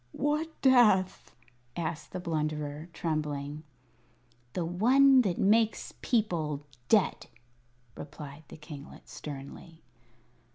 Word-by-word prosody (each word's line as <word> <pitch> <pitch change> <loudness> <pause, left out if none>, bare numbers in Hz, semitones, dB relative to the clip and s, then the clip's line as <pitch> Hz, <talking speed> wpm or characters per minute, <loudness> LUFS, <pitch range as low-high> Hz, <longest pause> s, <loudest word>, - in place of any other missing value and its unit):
"What 300 +3 0
death?" 225 -8 +4 0.4
asked 165 -2 -4
the 185 - -4
Blunderer, 155 -2 -3
trembling. 150 -3 -3 0.9
"The 175 - -1
one 255 +10 +5
that 190 -7 -1
makes 220 +2 +2
people 160 - 0 0.2
dead," - - +2 0.7
replied 150 0 -9
the - - -11
kinglet, 150 -1 -11
sternly. 150 +3 -9
165 Hz, 90 wpm, -29 LUFS, 150-215 Hz, 0.9 s, one